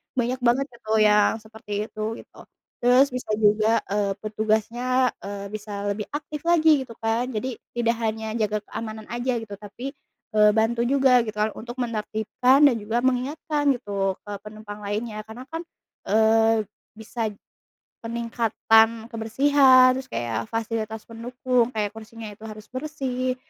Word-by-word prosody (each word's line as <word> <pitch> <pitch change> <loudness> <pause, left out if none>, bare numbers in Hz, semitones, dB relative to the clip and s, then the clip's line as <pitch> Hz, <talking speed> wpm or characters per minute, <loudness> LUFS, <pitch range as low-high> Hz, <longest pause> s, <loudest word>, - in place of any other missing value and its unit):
banyak 250 0 0
banget 250 +2 +2
itu 235 -2 -9
yang 210 0 +4
seperti 215 -1 -5
itu, 215 +1 -3
gitu. - - -20 0.4
Terus 250 +2 +5
bisa 250 -2 -5
juga, 215 +1 +4 0.2
eee, 200 -1 +1
petugasnya, 225 +4 0
eee, 200 0 -6
bisa 205 -1 -5
lebih 205 +1 -2
aktif 295 0 -5
lagi, 315 -4 +5
gitu 235 -3 -9
kan. 225 +3 -1
Jadi 255 +2 -3 0.2
tidak 235 -1 +2
hanya 220 0 -2
jaga 215 -2 0
keamanan 220 -1 -6
aja 240 +2 -2
gitu, 225 -3 -7
tapi, 210 +7 -7 0.4
eee, 210 0 +6
bantu 225 +2 +2
juga 260 -2 +4
gitu 215 -2 -4
kan, 215 0 +1
untuk 240 +2 -8
menertibkan 240 +3 +2
dan 275 - +6
juga 225 +3 -2
mengingatkan 285 +3 0
gitu 200 -5 -2
ke 205 - -7
penumpang 210 -1 -9
lainnya. 215 +1 -3
Karena 230 +4 -10
kan, 325 +2 -5 0.5
eee, 220 +1 +4 0.3
bisa 220 0 -3 0.7
peningkatan 230 -1 +2
kebersihan, 255 +2 +5
terus 265 - -5
kayak 115 -1 -2
fasilitas 220 -1 -3
pendukung, 245 +1 -1
kayak 210 -1 0
kursinya 225 0 -9
itu 215 - -17
harus 215 0 -9
bersih, 255 -2 -3
225 Hz, 145 wpm, -24 LUFS, 215-250 Hz, 0.7 s, eee